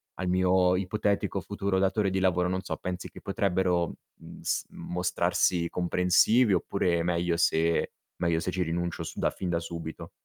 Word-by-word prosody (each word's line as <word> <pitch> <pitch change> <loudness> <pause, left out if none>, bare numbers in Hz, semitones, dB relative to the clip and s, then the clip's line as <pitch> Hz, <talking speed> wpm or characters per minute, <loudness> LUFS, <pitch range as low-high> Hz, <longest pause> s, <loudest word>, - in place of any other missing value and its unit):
al 90 - -4
mio 90 0 +3
ipotetico 100 +1 -1
futuro 100 0 -2
datore 100 +1 +2
di 95 - 0
lavoro, 90 -1 +2
non 95 0 -1
so 90 - -4
pensi 90 -1 -5
che - - -13
potrebbero, 90 -3 0 0.2
mhmm, - - -13
s - - -1
mostrarsi 90 -1 0
comprensivi 90 +6 +3
oppure 90 -1 +1
meglio 85 -1 0
se 85 0 +2 0.3
meglio 85 -2 +1
se 90 - -2
ci 95 - -2
rinuncio 85 +1 -2
su - - -7
da - - +2
fin 90 - -5
da 85 -1 +1
subito? 85 -2 -7
90 Hz, 165 wpm, -28 LUFS, 85-95 Hz, 0.3 s, mio